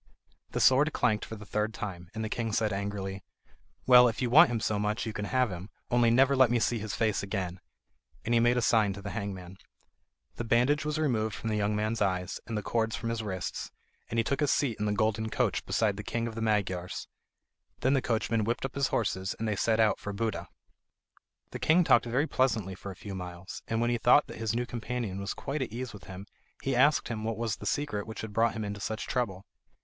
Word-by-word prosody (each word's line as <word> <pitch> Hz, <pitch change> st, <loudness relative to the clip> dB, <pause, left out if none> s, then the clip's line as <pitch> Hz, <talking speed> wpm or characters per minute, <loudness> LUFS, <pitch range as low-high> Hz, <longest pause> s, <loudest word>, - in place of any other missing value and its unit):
The -, -, -1 dB
sword 145 Hz, +4 st, +5 dB
clanked 110 Hz, -4 st, +1 dB
for 110 Hz, -, -7 dB
the 105 Hz, 0 st, -10 dB
third 105 Hz, +2 st, -1 dB
time, 85 Hz, -3 st, -6 dB
and 110 Hz, -, -3 dB
the -, -, -1 dB
king 115 Hz, 0 st, -2 dB
said 110 Hz, -1 st, +1 dB
angrily: 100 Hz, -1 st, -4 dB, 0.6 s
"Well, 125 Hz, -1 st, +8 dB
if 115 Hz, -, -2 dB
you 125 Hz, -2 st, -1 dB
want 135 Hz, -, +8 dB
him 120 Hz, -1 st, -1 dB
so 105 Hz, -1 st, 0 dB
much 105 Hz, +3 st, -1 dB
you 110 Hz, -, -4 dB
can 105 Hz, -, -3 dB
have 125 Hz, 0 st, +1 dB
him; 90 Hz, +3 st, -7 dB, 0.2 s
only 120 Hz, -1 st, +4 dB
never 135 Hz, +4 st, +4 dB
let 130 Hz, -2 st, +5 dB
me 120 Hz, -, +2 dB
see 120 Hz, 0 st, +1 dB
his 105 Hz, -1 st, -4 dB
face 110 Hz, -3 st, +1 dB
again." 95 Hz, -3 st, -3 dB, 0.7 s
And 115 Hz, -, 0 dB
he 120 Hz, -, +5 dB
made 120 Hz, +1 st, +3 dB
a 120 Hz, -, +1 dB
sign 110 Hz, -4 st, +3 dB
to 100 Hz, -, -9 dB
the 100 Hz, -, -4 dB
hangman. 95 Hz, -3 st, -5 dB, 0.8 s
The -, -, -2 dB
bandage 125 Hz, +6 st, +2 dB
was 150 Hz, 0 st, -1 dB
removed 110 Hz, -9 st, 0 dB
from 110 Hz, -, -3 dB
the -, -, 0 dB
young 105 Hz, 0 st, 0 dB
man's 110 Hz, +2 st, -1 dB
eyes, 90 Hz, -2 st, 0 dB
and 115 Hz, -2 st, -3 dB
the 105 Hz, -, -3 dB
cords 110 Hz, -1 st, 0 dB
from 115 Hz, -, -4 dB
his 115 Hz, -1 st, -2 dB
wrists, 95 Hz, -4 st, -4 dB, 0.4 s
and 115 Hz, -, -3 dB
he 115 Hz, -, +3 dB
took 135 Hz, +4 st, -1 dB
his 145 Hz, -2 st, +2 dB
seat 125 Hz, -7 st, +1 dB
in 105 Hz, -, 0 dB
the -, -, +1 dB
golden 110 Hz, +1 st, 0 dB
coach -, -, 0 dB
beside 105 Hz, -3 st, +1 dB
the 105 Hz, -, -5 dB
king 115 Hz, +2 st, -2 dB
of 115 Hz, -, -5 dB
the 115 Hz, -, -5 dB
Magyars. 95 Hz, -5 st, -1 dB, 0.7 s
Then 130 Hz, +2 st, +3 dB
the 135 Hz, -, +3 dB
coachman 115 Hz, -1 st, 0 dB
whipped 120 Hz, +4 st, -1 dB
up 135 Hz, -, -5 dB
his 140 Hz, -1 st, +1 dB
horses, 100 Hz, -4 st, -1 dB
and 115 Hz, -, -2 dB
they 105 Hz, -, 0 dB
set 110 Hz, +3 st, +1 dB
out 110 Hz, -2 st, +3 dB
for 105 Hz, -, -5 dB
Buda. 110 Hz, +2 st, -2 dB, 1.0 s
The -, -, -6 dB
king 170 Hz, +3 st, +4 dB
talked 120 Hz, -7 st, +4 dB
very 125 Hz, +5 st, +1 dB
pleasantly 110 Hz, -, 0 dB
for 95 Hz, +2 st, -8 dB
a 95 Hz, -, -7 dB
few 100 Hz, +2 st, -8 dB
miles, 90 Hz, 0 st, -7 dB
and 115 Hz, -, -1 dB
when 120 Hz, +1 st, +1 dB
he 120 Hz, -, 0 dB
thought 125 Hz, +6 st, +5 dB
that -, -, -10 dB
his 115 Hz, -1 st, -1 dB
new 120 Hz, +1 st, 0 dB
companion 120 Hz, -5 st, -4 dB
was 100 Hz, -, -3 dB
quite 140 Hz, +2 st, -4 dB
at 130 Hz, -, -3 dB
ease 125 Hz, +1 st, -5 dB
with 105 Hz, -, -11 dB
him, 95 Hz, +1 st, -8 dB, 0.4 s
he 135 Hz, -1 st, 0 dB
asked 140 Hz, +4 st, +4 dB
him 110 Hz, -2 st, -3 dB
what 110 Hz, 0 st, -2 dB
was 115 Hz, -2 st, -2 dB
the 105 Hz, -, -6 dB
secret 105 Hz, -6 st, -2 dB
which 110 Hz, -, -6 dB
had 110 Hz, -2 st, -7 dB
brought 115 Hz, +1 st, +2 dB
him 110 Hz, -1 st, -4 dB
into 100 Hz, 0 st, -5 dB
such 110 Hz, +2 st, -3 dB
trouble. 100 Hz, -7 st, -2 dB
110 Hz, 240 wpm, -29 LUFS, 100-120 Hz, 1.0 s, Well